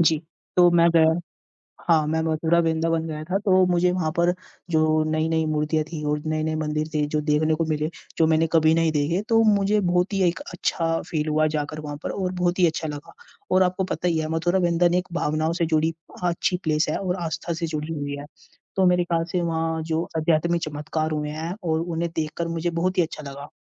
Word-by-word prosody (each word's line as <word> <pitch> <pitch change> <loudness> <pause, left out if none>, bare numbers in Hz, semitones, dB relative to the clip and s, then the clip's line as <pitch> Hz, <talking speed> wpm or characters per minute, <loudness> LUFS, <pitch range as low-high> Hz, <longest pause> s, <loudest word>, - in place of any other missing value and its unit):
जी, 160 -1 +4 0.4
तो 175 -1 +7
मैं 170 0 +5
गया 160 0 +4 0.7
हाँ, 160 -3 +4
मैं 160 +1 0
मथुरा 160 +1 +1
वृंदावन 165 0 0
गया 155 -1 -5
था 185 +4 0
तो 185 -1 +5
मुझे 180 0 +2
वहाँ 180 -4 -1
पर 175 +1 +3 0.4
जो 155 0 +3
नई-नई 160 0 +1
मूर्तियाँ 155 0 0
थी 155 -2 -6
और 150 0 0
नए-नए 155 0 -1
मंदिर 155 0 -2
थे 150 -1 +1
जो 150 - +1
देखने 150 +1 +2
को 165 +1 -1
मिले, 155 0 -1 0.3
जो 160 - +4
मैंने 160 0 +3
कभी 160 0 +5
नहीं 165 -1 +2
देखे 155 +5 0
तो 225 0 +5
मुझे 200 +1 +2
बहुत 180 +1 +1
ही 195 - +1
एक 170 - -1
अच्छा 165 -1 -1
फ़ील 155 -2 -1
हुआ 155 0 +2
जाकर 150 +1 -3
वहाँ 145 -1 -6
पर - - -3
और 185 -2 -2
बहुत 180 0 0
ही 180 - +6
अच्छा 160 0 -2
लगा। 145 -1 -8 0.4
और 185 - +5
आपको 185 +1 0
पता 180 -1 -2
ही 165 -2 +1
है 155 - -2
मथुरा 175 +3 +1
वृंदन 175 0 +2
एक 180 0 0
भावनाओं 155 -1 0
से 170 -1 0
जुड़ी 160 0 +1 0.3
अच्छी 175 +1 0
प्लेस 155 0 +2
है - - 0
और 185 -2 -2
आस्था 165 +1 -3
से 165 0 -3
जुड़ी 155 0 -4
हुई 145 -2 -4
है। 145 - -8 0.5
तो 190 - +3
मेरे 180 0 +3
ख्याल 170 -1 0
से 180 - 0
वहाँ 160 -1 -1
जो 160 +1 -1
अध्यात्मिक 170 +1 +1
चमत्कार 155 +1 -3
हुए 150 -1 -2
हैं 160 +3 -4
और 160 -2 0
उन्हें 170 0 -2
देखकर 160 +2 -2
मुझे 165 +1 -2
बहुत 175 +2 -1
ही 180 - +5
अच्छा 155 -1 -7
लगा। 140 +1 -9
160 Hz, 215 wpm, -24 LUFS, 155-175 Hz, 0.7 s, तो